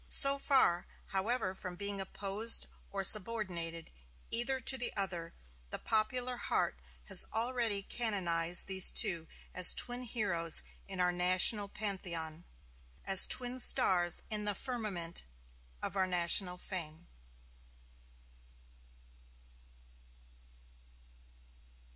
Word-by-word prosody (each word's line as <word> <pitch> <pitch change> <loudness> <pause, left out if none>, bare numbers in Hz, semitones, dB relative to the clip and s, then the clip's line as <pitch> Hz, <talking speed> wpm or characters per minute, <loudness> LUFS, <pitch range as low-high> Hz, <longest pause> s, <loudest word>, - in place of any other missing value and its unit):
So 275 0 +8
far, 260 - +1 0.2
however 195 0 -3
from 185 -1 -9
being 200 +1 -6
opposed 200 +4 -2 0.2
or 195 -1 -6
subordinated 185 -6 +1 0.4
either 250 +3 -2
to 260 +1 +3
the 245 -1 -3
other, 175 -4 -4 0.3
the - - -7
popular 245 +3 -3
heart - - -2 0.2
has - - +4
already 225 -3 -2
canonized 180 -7 0
these 190 -1 +5
two 165 -3 +3 0.3
as 185 -1 +6
twin 245 0 0
heroes 205 -9 -1 0.2
in 190 -2 -7
our 180 0 0
national 185 +4 +3
pantheon, 175 -6 -4 0.6
as 195 -1 +5
twin 250 0 +1
stars 175 -7 +3
in 210 -1 -4
the 205 -1 -2
firmament 200 -9 -5 0.6
of - - -6
our 190 -1 -1
national 180 +1 +2
fame. 170 -4 -8
195 Hz, 100 wpm, -31 LUFS, 175-225 Hz, 0.6 s, So